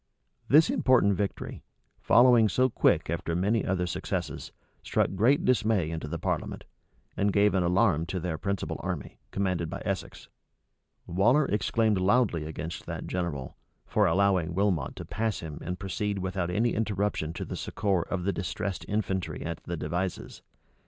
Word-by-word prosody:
This 155 +3 +6
important 120 -6 +4
victory, 100 +1 -3 0.4
following 120 -3 +5
so 130 +5 +2
quick - - +2
after 85 0 -2
many 100 +5 +1
other 90 -1 0
successes, 85 - -4 0.3
struck - - 0
great 115 +9 +3
dismay 110 -9 +2
into 80 -1 -4
the - - -3
parliament, - - -3 0.5
and 100 0 +1
gave 100 +1 +3
an 95 - +2
alarm 90 -2 +2
to 95 - -3
their 85 -3 -3
principal 100 0 -2
army, - - -5
commanded 90 -4 -1
by - - -5
Essex. - - -4 0.8
Waller 120 - +3
exclaimed 110 -1 +1
loudly 95 -5 +2
against 80 +1 -6
that - - -5
general, 85 -8 -3 0.3
for - - +2
allowing 95 -4 +2
Wilmot 95 -8 0
to - - -7
pass 110 0 -2
him, 80 -3 -7
and 90 +1 -4
proceed 100 +2 -2
without 95 -2 -2
any 115 +6 +1
interruption 105 -6 -1
to - - -5
the - - -5
succor 100 -4 -1
of 90 +1 -3
the 100 +2 0
distressed 95 0 -3
infantry 95 -3 -2
at 85 -1 -5
the 85 - -4
Devizes. 85 +4 -3
95 Hz, 155 wpm, -28 LUFS, 85-105 Hz, 0.8 s, This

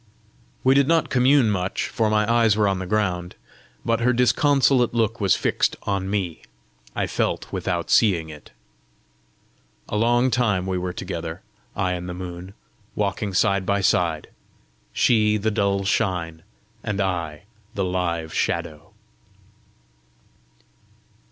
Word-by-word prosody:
We 130 - +5
did 140 0 +3
not 165 0 +2
commune 130 -3 +4
much, 95 -1 -2
for 110 -2 0
my 105 0 +2
eyes 115 -3 +3
were 105 -1 +3
on 95 -1 0
the 95 - -5
ground; 90 -4 -1 0.5
but 115 - +1
her 125 +2 +2
disconsolate 125 +1 +3
look 115 -1 0
was 95 -3 +3
fixed - - 0
on 100 -1 -2
me: 95 -5 -2 0.5
I - - 0
felt - - -2
without - - -2
seeing 90 -8 +3
it. 75 -1 -12 1.4
A - - -4
long 120 +3 +2
time 105 -6 +1
we 95 -1 -1
were 90 0 -3
together, 85 -2 -6 0.3
I 95 -2 0
and 90 0 -4
the 90 - -5
moon, 90 +1 -8 0.4
walking 100 -1 -2
side 100 -1 +2
by 100 +1 0
side, 85 -5 +1 0.6
she 110 -3 +3
the 110 +1 -1
dull 100 -2 0
shine, 90 -6 -1 0.4
and 105 -2 -3
I 85 -5 -2 0.3
the 95 - 0
live 85 -3 -2
shadow. 80 +5 -3
100 Hz, 135 wpm, -23 LUFS, 90-115 Hz, 1.4 s, We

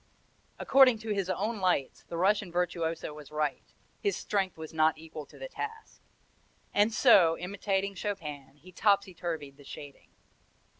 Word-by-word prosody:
According 265 -3 +6
to 225 - -6
his 195 -3 -1
own 210 +5 -1
lights 180 -8 0
the 170 - -6
Russian 195 +1 +2
virtuoso 170 -3 -1
was 150 -1 -11
right: 150 -1 -2 0.3
his 405 - 0
strength 195 -4 -1
was 160 0 -8
not 155 0 +3
equal 155 -2 -9
to - - -16
the - - -6
task, 445 -2 -7 0.7
and 205 +2 +4
so, 190 -9 +6
imitating 195 +1 -1
Chopin, 150 -9 -5
he 160 +6 -16
topsy 200 0 +2
turvied 160 -5 -5
the 145 - -15
shading. 140 0 -11
180 Hz, 150 wpm, -30 LUFS, 155-205 Hz, 0.7 s, According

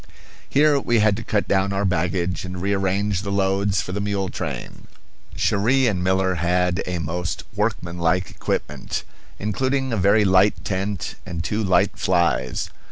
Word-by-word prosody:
Here 145 0 +4
we 120 -3 +1
had 105 -1 +4
to 115 - -5
cut 105 -2 0
down 95 0 +2
our 100 +1 0
baggage 90 0 0
and 90 -1 -6
rearrange 100 0 0
the 100 -1 -4
loads 100 0 +1
for - - -6
the 100 +2 -2
mule 100 -2 -1
train. - - -6 0.5
Cherrie 125 +7 +2
and 95 -6 0
Miller 95 0 +2
had 90 +1 +1
a 90 -1 -2
most 85 0 -3
workmanlike 90 -4 0
equipment, - - -3 0.3
including 130 +5 -1
a - - 0
very 100 +2 +4
light 95 +2 +3
tent 100 0 -3
and 85 -2 -5
two 105 +6 -1
light 95 +2 +2
flies. 85 -8 +1
95 Hz, 155 wpm, -22 LUFS, 90-105 Hz, 0.5 s, Here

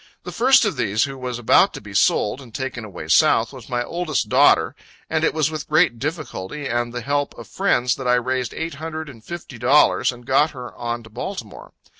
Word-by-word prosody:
The - - -7
first 255 0 +4
of 195 -9 -1
these, 110 -3 +1
who 135 -1 -3
was 125 -2 -5
about 120 -2 +4
to - - -6
be - - -12
sold, 105 +6 +2
and 125 -4 -13
taken 130 -3 -4
away 95 -7 -8
South, - - +4
was - - -11
my 120 0 -1
oldest 165 +1 -2
daughter; - - +4 0.4
and - - +1
it - - +3
was 155 -1 0
with 155 -2 -6
great 155 -6 +3
difficulty 150 - -5
and 120 -1 -1
the 120 0 -5
help 145 +3 -2
of - - -10
friends 125 -11 +1
that 130 - -5
I 125 - +4
raised 125 0 -1
eight 165 0 -4
hundred 160 +1 -6
and 115 -5 -13
fifty 165 -7 -8
dollars, 135 +4 +4
and 120 -1 -13
got 140 +5 +2
her 125 -1 -8
on 120 0 -4
to 110 - -15
Baltimore. - - -7
130 Hz, 215 wpm, -21 LUFS, 120-155 Hz, 0.4 s, first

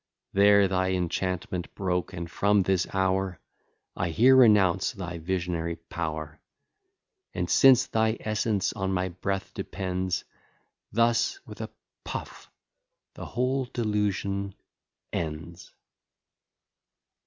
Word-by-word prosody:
There 100 0 +6
thy 95 0 0
enchantment 90 0 -2
broke, 90 -2 -1
and 85 -3 -5
from 100 +3 +2
this 95 -1 +1
hour 95 -2 0 0.6
I 90 - -1
here 125 +11 +5
renounce 105 -7 +5
thy 90 -5 -6
visionary 85 -1 -2
power; 80 -2 -5 1.0
And 90 - -1
since 130 +5 +6
thy 110 0 +1
essence 105 -2 0
on 95 0 -2
my 95 0 0
breath 95 +2 -4
depends 95 -1 -3 0.7
Thus 115 - +2
with - - -9
a - - -5 0.3
puff - - -7 0.6
the - - -8
whole 130 +2 0
delusion 100 -4 -1 0.6
ends. 85 +2 -5
95 Hz, 105 wpm, -27 LUFS, 90-105 Hz, 1.0 s, There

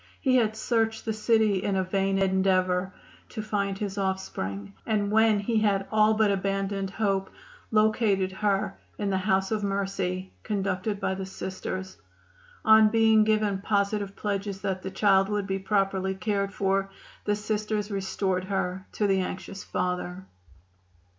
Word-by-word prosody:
He 255 -2 +3
had 220 -2 +1
searched 225 -1 0
the 220 - -1
city 215 -2 +2
in 200 - 0
a 190 - +2
vain 195 +1 0
endeavor 190 -1 +2 0.4
to 215 - -5
find 200 -2 -1
his 200 -1 -3
offspring, 100 - -3
and 205 -2 0
when 220 0 +4
he 225 +2 +1
had 200 -2 +1
all 215 0 +4
but 215 -1 +3
abandoned 195 0 -1
hope 195 -1 -1 0.4
located 215 -3 +2
her 195 0 0 0.2
in 205 -1 -1
the 190 - +1
"House 190 0 +1
of 215 -1 0
Mercy," 195 -2 -2
conducted 200 0 -2
by 190 - 0
the 190 0 -5
Sisters. 190 0 -5 0.7
On 220 0 +7
being 220 -1 +5
given 215 -2 +1
positive 200 -1 0
pledges 200 -1 -3
that 190 -2 -2
the 190 - -4
child 195 0 +3
would 205 -1 -1
be 195 0 -2
properly 195 -1 0
cared 200 0 -1
for 195 -1 0 0.4
the 210 - +2
Sisters 210 0 -2
restored 190 -1 -1
her 190 -1 -2
to 210 - 0
the 195 -1 +3
anxious 190 +1 -5
father. 180 0 -3
195 Hz, 150 wpm, -27 LUFS, 190-215 Hz, 0.7 s, On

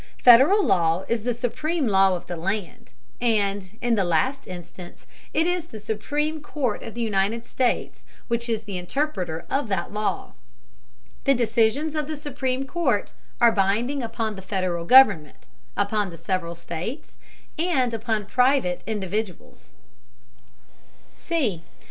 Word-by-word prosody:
Federal 270 - +7
law 170 0 +2
is 235 -1 0
the 245 +2 -1
supreme 305 +6 -1
law 195 -3 +4
of 175 - -7
the 175 - -5
land, 195 +6 -4 0.3
and, 205 -4 0
in 240 -1 +2
the 205 -4 +2
last 185 - 0
instance, 175 0 -10 0.3
it 320 - +2
is 355 -2 -1
the 220 - -9
Supreme 290 +9 -2
Court 275 -7 -2
of 225 - -8
the 235 - -2
United 215 +2 0
States 250 -2 -1 0.2
which 235 0 -1
is 225 -1 -1
the 200 -3 -5
interpreter 180 - -2
of 275 -3 -1
that 195 -2 -2
law. 210 0 -2 0.9
The 275 - +5
decisions 235 +6 +1
of 305 -2 -2
the 310 - -3
Supreme 270 -2 -3
Court 270 -8 0 0.3
are 235 -1 +6
binding 225 +7 +1
upon 225 -2 -3
the 190 - -8
Federal 185 -3 -2
government, 200 - +5 0.3
upon 205 0 0
the 170 - -10
several 170 0 -2
states, 170 - -6 0.4
and 275 -9 +1
upon 220 -2 -1
private 250 -5 +2
individuals. 205 - -4
220 Hz, 135 wpm, -24 LUFS, 190-260 Hz, 0.9 s, Federal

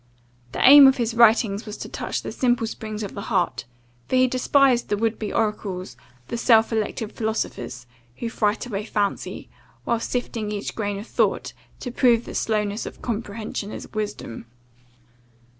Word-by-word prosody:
The - - +3
aim 280 0 +11
of 265 - +4
his 235 -2 -1
writings 225 -2 +4
was 210 - -6
to - - -6
touch - - -4
the - - -5
simple 240 -3 +1
springs 215 -1 -5
of 200 - -6
the 200 - -6
heart; 180 - 0 0.4
for - - 0
he 255 0 +5
despised 255 0 +3
the 205 - +1
would 225 +1 -1
be 215 - -3
oracles, 195 - -2 0.3
the - - -3
self 225 -1 +4
elected 220 0 -2
philosophers, 170 - -3 0.3
who 235 - -4
fright 215 -1 0
away 210 -4 -4
fancy, 205 -2 -2 0.4
while 235 -1 0
sifting 230 -3 -3
each 205 -1 -4
grain 205 -2 -2
of 205 - -7
thought - - 0 0.3
to 245 - -4
prove 240 -2 +3
that - - -8
slowness 210 -1 -1
of - - -11
comprehension 215 -2 -4
is - - -9
wisdom. 210 - -5
220 Hz, 165 wpm, -23 LUFS, 205-235 Hz, 0.4 s, aim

